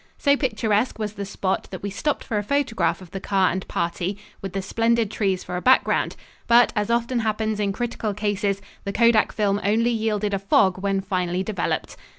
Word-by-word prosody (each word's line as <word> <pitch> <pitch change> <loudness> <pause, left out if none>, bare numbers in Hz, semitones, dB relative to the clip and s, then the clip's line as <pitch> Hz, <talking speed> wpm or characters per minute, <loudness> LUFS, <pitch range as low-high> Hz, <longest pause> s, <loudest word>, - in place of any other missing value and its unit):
So 280 -1 +3
picturesque 220 -4 0
was 215 -1 -3
the 200 -2 -5
spot 190 -1 -2
that 185 - -8
we 200 - -3
stopped 295 +9 -1
for 215 - -1
a - - -3
photograph 260 -4 0
of 180 - -13
the 195 - -4
car 190 -1 +2
and 185 +1 -4
party, 175 +3 -2 0.2
with 195 -2 -6
the 195 - -1
splendid 230 +1 +1
trees 195 -5 0
for 180 - -5
a - - -3
background, 260 +5 +3 0.3
but, 235 +1 +5
as 210 0 0
often 235 +1 +1
happens 220 -1 -1
in 200 -1 +1
critical 220 -1 -3
cases, 205 -1 -1 0.2
the 200 - -4
kodak 230 -1 +4
film 205 -2 0
only 225 +4 +2
yielded 215 -2 -1
a 195 - 0
"fog" 190 -1 +3
when 195 -1 0
finally 180 -1 -1
developed. 210 +1 -2
210 Hz, 195 wpm, -23 LUFS, 195-230 Hz, 0.3 s, but